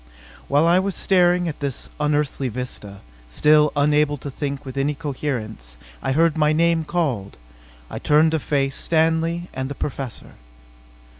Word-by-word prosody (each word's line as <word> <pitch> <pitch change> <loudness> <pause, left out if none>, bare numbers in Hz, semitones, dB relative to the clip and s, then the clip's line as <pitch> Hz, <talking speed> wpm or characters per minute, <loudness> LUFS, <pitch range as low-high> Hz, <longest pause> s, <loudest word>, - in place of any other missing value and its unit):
While 145 +3 +3
I 175 +2 +5
was 195 0 -2
staring 180 -2 +3
at 155 - -5
this 140 -3 -4
unearthly 150 -3 0
vista, 110 -5 -7 0.3
still 150 - +4
unable 145 0 +2
to 140 +1 -7
think 140 0 -4
with 130 -1 -7
any 140 +2 0
coherence. 125 - -5 0.2
I 135 - -1
heard 165 +2 +3
my 155 -1 +2
name 165 0 +2
called. 135 - -2 0.5
I - - -6
turned 155 +2 +4
to 160 - +1
face 135 -1 -1
Stanley 165 +1 +1
and 130 0 -4
the 140 - -5
Professor. 135 -4 -5
150 Hz, 150 wpm, -22 LUFS, 135-160 Hz, 0.5 s, I